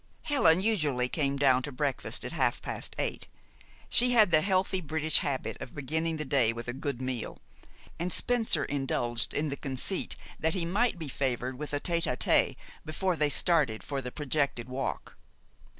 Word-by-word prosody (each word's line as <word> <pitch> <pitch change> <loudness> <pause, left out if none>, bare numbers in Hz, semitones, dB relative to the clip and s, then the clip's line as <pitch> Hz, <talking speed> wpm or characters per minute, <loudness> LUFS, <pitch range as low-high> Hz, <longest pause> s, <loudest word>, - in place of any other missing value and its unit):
Helen 190 - +3
usually 150 - +1
came 140 0 0
down 130 -2 +4
to 145 - -6
breakfast 140 0 -2
at - - -2
half - - +1
past - - -3
eight. - - -2 0.6
She 245 +1 +6
had 215 -6 +5
the 155 -1 +5
healthy 185 0 0
British 155 0 +1
habit 135 -2 -3
of 125 - -8
beginning 160 +3 -2
the 155 - -4
day 130 -5 +2
with 115 0 -7
a 120 - -3
good 140 -1 -4
meal, 130 -3 -4 0.6
and 175 +2 -2
Spencer 225 -12 +2
indulged 125 -4 0
in 150 +1 -1
the 140 - -3
conceit 135 +7 -3 0.2
that 160 +2 +1
he 175 -3 -1
might 205 +5 +1
be 160 -3 -6
favored 130 -1 -2
with 150 - -5
a 145 - -1
tête 170 -1 0
à 125 - -3
tête - - +3 0.3
before 180 +4 -1
they 150 -1 +1
started 145 -8 +2
for 140 -1 -3
the 125 -1 -6
projected 140 -4 -1
walk. 130 +1 -5
145 Hz, 180 wpm, -29 LUFS, 130-170 Hz, 0.6 s, She